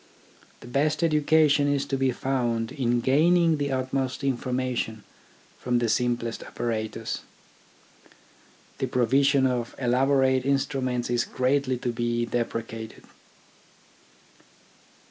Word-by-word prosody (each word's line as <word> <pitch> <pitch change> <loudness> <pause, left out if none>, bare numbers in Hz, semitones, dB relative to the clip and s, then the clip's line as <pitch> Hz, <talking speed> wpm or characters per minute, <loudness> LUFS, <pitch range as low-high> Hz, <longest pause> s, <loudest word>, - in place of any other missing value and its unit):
The - - -11
best 150 +6 0
education 150 -2 +3
is 140 -1 0
to 135 - -2
be 135 0 +1
found 120 -3 -1
in 120 -4 0
gaining 165 +5 +3
the 140 -1 -2
utmost 130 0 -2
informa 130 -1 -1
tion 110 -2 -3 0.6
from 125 -1 0
the 120 -1 +1
simplest 120 0 -1
apparatus. 110 -1 -4 1.6
The 130 - -1
provision 135 +3 +3
of 125 -2 -1
elaborate 130 +1 +2
instruments 130 -3 -1
is 120 0 +2
greatly 130 0 0
to 125 0 -2
be 120 0 -1
depre 115 -1 -2
cated. 110 -1 -9
130 Hz, 110 wpm, -26 LUFS, 120-140 Hz, 1.6 s, education